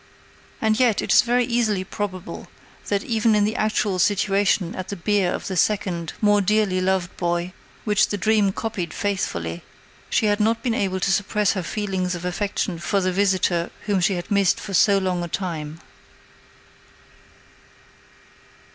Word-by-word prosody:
And 220 +1 +1
yet, 240 -5 +3
it - - +1
is - - +8
very 245 +1 +1
easily 225 -5 0
probable 190 -1 -6 0.4
that 200 -1 0
even 225 -1 +2
in 210 - +3
the 215 +2 -1
actual 210 -3 0
situation 200 -2 +2
at 185 0 -6
the 200 - -3
bier 195 0 +1
of - - -4
the 190 - -3
second, 175 -3 0
more 205 -1 +4
dearly 200 -2 +1
loved 185 -1 0
boy, 175 +1 -1 0.3
which 210 -1 +3
the 205 - -3
dream 210 0 +2
copied 190 -6 -4
faithfully, 85 - -2 0.5
she - - +1
had 205 0 +2
not 225 +2 +1
been 240 - 0
able 190 -3 -1
to 190 +1 +1
suppress 205 +1 +1
her 190 - -2
feelings 185 -1 -2
of 175 0 -7
affection 185 -1 -2
for 175 +4 0
the 185 -1 0
visitor 185 -3 +1 0.2
whom 205 -2 +1
she 190 +2 +2
had 175 +4 -6
missed 200 -3 +3
for 200 - -7
so 200 +2 +5
long 185 -2 -1
a - - -3
time. 165 -3 -4
195 Hz, 165 wpm, -23 LUFS, 180-210 Hz, 0.5 s, is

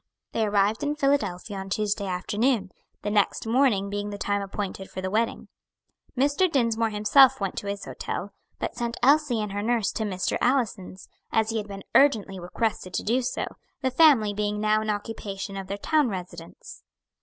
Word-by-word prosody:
They 220 -1 0
arrived 205 +1 +2
in 295 +1 -1
Philadelphia 270 -9 0
on 195 0 -6
Tuesday 205 0 -1
afternoon, 205 +3 0 0.3
the 205 - -1
next 205 +1 +1
morning 225 -4 +2
being 205 +1 -3
the 205 - -5
time 205 0 -1
appointed 195 -1 -5
for - - -7
the 185 0 -3
wedding. 225 +2 -1 0.7
Mr. 290 +7 +2
Dinsmore 230 -4 +1
himself 255 +6 +5
went 195 -2 -2
to 200 - -4
his 200 0 -4
hotel, - - -5 0.2
but - - -3
sent 235 -1 -3
Elsie 280 -3 +4
and 210 -2 -3
her 205 +1 -2
nurse 230 -1 +1
to 220 - -3
Mr. 185 -3 -1
Allison's, 220 -8 -1 0.2
as 220 0 +2
he 225 - -1
had 210 -1 -3
been 195 -1 -8
urgently 220 -9 +3
requested 185 0 -2
to - - -1
do, 240 +4 +1 0.6
the 260 -1 0
family 255 -8 +5
being 210 0 -1
now 215 0 +2
in 215 - -3
occupation 205 -2 -4
of 195 -1 -5
their 200 - -4
town 300 +4 +2
residence. 175 -4 -8
210 Hz, 180 wpm, -26 LUFS, 200-240 Hz, 0.7 s, himself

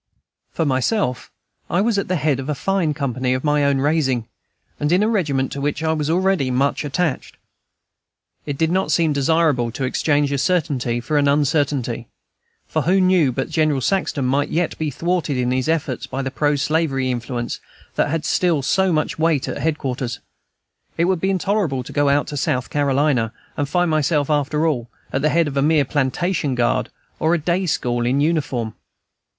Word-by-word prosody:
For 165 - -2
myself, 130 - 0 0.4
I 175 - +1
was 210 0 +2
at - - -3
the 185 - 0
head 145 -4 +1
of 135 +2 -5
a 150 - 0
fine 175 -2 0
company 130 -2 -1
of 130 - -4
my 150 -1 +2
own 140 -1 +2
raising, 135 -5 +1 0.5
and 150 +1 0
in 185 +4 +4
a - - +2
regiment 150 -12 0
to 140 - -5
which 145 +2 -2
I 160 0 +2
was 150 -1 -2
already 180 -5 +2
much 135 +4 +1
attached. 150 0 -2 1.1
It 145 -2 -3
did 160 +2 +1
not 190 +1 +1
seem 160 -3 +2
desirable 140 -4 +2
to 135 - -4
exchange 145 +2 +1
a 140 - 0
certainty 135 -8 0
for 145 +5 0
an 145 - +2
uncertainty; 140 -5 0 0.6
for - - -1
who 185 +3 +2
knew 185 -7 +4
but 135 +5 -3
General 155 -3 +2
Saxton 150 -3 0
might 140 +3 +1
yet 170 0 0
be 155 -1 -1
thwarted 165 -1 -1
in 125 0 0
his 130 +3 0
efforts 165 -2 -1
by 135 - -3
the 135 - -3
pro 145 +2 +1
slavery 140 -3 0
influence 120 0 -4 0.3
that - - +1
had 155 0 -2
still 165 -5 +1
so 190 +6 +2
much 155 -1 -1
weight 160 -4 +1
at - - -4
head 160 -1 0
quarters? 125 -3 -3 0.8
It 170 - +3
would 185 -2 0
be 190 - +1
intolerable 190 -8 0
to - - -10
go 145 -1 +2
out 145 +1 +2
to 145 - -5
South 130 -2 -1
Carolina, 140 -5 +1 0.2
and 145 -1 -2
find 175 +1 +1
myself, 155 -1 +1
after 150 +1 +1
all, 125 -7 -1 0.2
at 135 - 0
the 155 - +2
head 165 +1 +2
of 140 -1 -4
a - - +3
mere 150 0 +3
plantation 145 +2 0
guard 120 -1 +1 0.3
or 160 +2 +2
a - - +2
day 175 +4 0
school 120 -5 0
in 130 +3 +1
uniform. 140 -8 0
145 Hz, 190 wpm, -21 LUFS, 135-165 Hz, 1.1 s, in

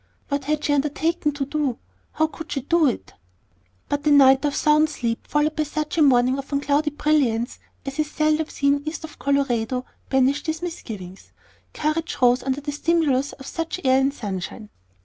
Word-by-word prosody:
What 280 -1 -2
had 300 +1 -1
she 290 - +2
undertaken 300 +2 0
to 280 -1 -2
do? 285 -4 -1 0.4
How 315 - +2
could 315 0 -8
she 275 - -1
do 330 +3 +3
it? 250 - -3 0.7
But 290 +1 -2
a - - +6
night 270 -2 +6
of 290 - 0
sound 305 +1 +4
sleep 235 -5 -3
followed 300 +1 +1
by 310 - 0
such 305 0 -3
a 330 - +2
morning 260 -1 +4
of 275 +2 -8
unclouded 290 +1 0
brilliance 250 -6 +1 0.3
as 275 +2 -6
is 305 -1 0
seldom 310 0 +1
seen 280 -1 +1
east 310 0 -4
of 315 - -10
Colorado 255 -3 0 0.2
banished 265 +3 +2
these 320 +2 -2
misgivings. 200 - -7 0.4
Courage 310 +2 -1
rose 245 0 +4
under 265 +2 -2
the 290 +1 -4
stimulus 290 -3 +1
of 270 - -12
such 330 +4 -4
air 260 0 +4
and 270 +1 +2
sunshine. 205 -3 -6
285 Hz, 180 wpm, -23 LUFS, 265-305 Hz, 0.7 s, a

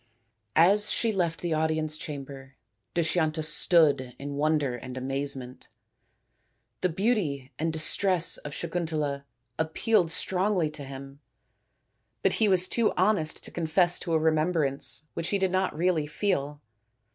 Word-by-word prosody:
As 200 +6 +4
she 230 - +1
left 170 -4 -1
the 175 -2 -1
audience 155 0 0
chamber 135 -3 -8 0.4
Dushyanta 160 -2 0
stood 150 -6 +3
in 140 +1 -6
wonder 145 -2 +1
and 125 +2 -8
amazement. 135 -1 -3 1.1
The 185 - +2
beauty 165 - -1
and 160 +1 0
distress 170 +2 +1
of 145 - -8
Sakuntala 155 -5 -2 0.3
appealed 165 +3 +1
strongly 180 -1 0
to 145 -2 -6
him, 135 +1 -9 1.0
but - - +3
he 220 - +5
was 185 -1 +4
too 230 -2 +1
honest 185 -5 +1
to - - -6
confess 175 +2 +2
to 170 - -3
a 160 - +4
remembrance 155 -2 0
which 165 - -3
he 200 - +1
did 190 -2 0
not 185 -4 0
really 165 -3 +1
feel. 150 -4 -2
160 Hz, 135 wpm, -27 LUFS, 145-180 Hz, 1.1 s, he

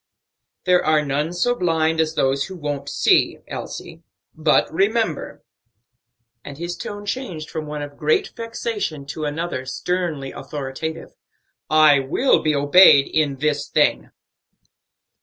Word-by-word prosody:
"There 180 -1 +3
are 155 -1 +2
none 145 +4 -1
so 180 +8 +1
blind 165 -6 +1
as 160 0 -2
those 135 0 +1
that 190 - -8
won't 145 -4 -4
see, - - +2
Elsie; - - -7 0.3
but, 155 0 +3
remember" 200 -2 -1 1.0
and 140 -1 -9
his 175 +2 -4
tone 205 0 -7
changed 200 -9 -5
from 155 -1 -5
one 150 0 -5
of 145 0 -9
great 155 +1 +1
vexation 225 -10 -4
to 150 +2 -5
another 150 -2 -3
sternly 160 -2 -3
authoritative 150 +3 -6 0.6
"I 155 -2 +6
will 145 - +2
be 155 -1 +1
obeyed 145 0 +6
in 150 -3 +1
this 150 +2 -1
thing." - - +1
155 Hz, 130 wpm, -21 LUFS, 145-180 Hz, 1.0 s, I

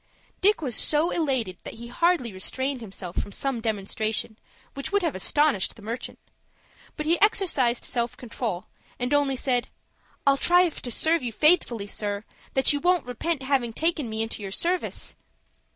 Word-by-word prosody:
Dick 400 -2 +4
was 250 -5 -2
so 310 +3 +3
elated 260 - -1
that - - -7
he 235 +1 -9
hardly 255 - +1
restrained 260 +7 -2
himself 190 -4 -7
from - - -9
some 265 +1 -1
demonstration 220 +1 -2 0.3
which 275 +5 -5
would 405 -1 +2
have 330 - +1
astonished 280 +3 +2
the 220 - -14
merchant; 230 +4 -5 0.8
but 305 - -3
he 335 +2 +2
exercised 310 - +3
self 240 0 -1
control, 230 -7 -4 0.3
and 250 +3 -1
only 285 -2 +3
said, 250 -1 0 0.6
"I'll 275 0 +5
try 355 +4 +5
to 260 -6 -6
serve 320 +7 +2
you 245 - -3
so 215 - -19
faithfully, 300 - +4
sir, 205 0 -3 0.3
that 265 +2 +4
you 290 - 0
won't 355 +2 +2
repent 265 +4 -2
having 260 -4 +1
taken 310 -3 0
me 220 0 -1
into 225 -1 -5
your 195 - -4
service." 345 - -1
255 Hz, 170 wpm, -26 LUFS, 225-310 Hz, 0.8 s, I'll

